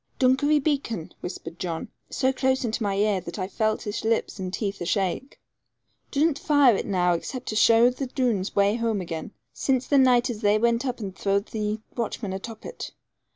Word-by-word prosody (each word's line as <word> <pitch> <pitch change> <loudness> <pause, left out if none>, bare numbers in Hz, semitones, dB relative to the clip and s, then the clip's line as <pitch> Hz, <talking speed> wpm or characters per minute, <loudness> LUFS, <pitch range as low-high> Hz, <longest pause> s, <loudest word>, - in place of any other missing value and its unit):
'Dunkery 265 +4 +3
Beacon,' 270 - -1
whispered 175 -1 -7
John, 170 +1 -4 0.2
so 260 -1 +1
close 260 -1 +1
into 225 +1 -2
my 200 -2 0
ear, 205 -1 +2
that 170 -1 -7
I 185 -2 -2
felt 215 +2 -1
his 210 -1 -4
lips 225 -2 0
and 185 -1 -3
teeth 200 0 -3
ashake; 195 +8 -1 0.7
'dursn't 295 +1 +1
fire 285 -6 +5
it - - -3
now 180 -3 +2
except 250 +9 -4
to 215 - -3
show 230 +2 +6
the 260 +2 -4
Doones 240 -7 -1
way 200 +2 +3
home 230 -3 0
again, 165 -3 -5 0.2
since 260 -2 0
the 280 - +4
naight 250 -1 +4
as 220 -2 -7
they 205 0 +4
went 235 +3 +1
up 245 -2 -3
and 195 -3 -5
throwed 200 +2 0
the 215 0 -2
watchmen 220 -4 -3
atop 220 +3 -7
of - - -4
it. - - -8
220 Hz, 195 wpm, -25 LUFS, 195-255 Hz, 0.7 s, show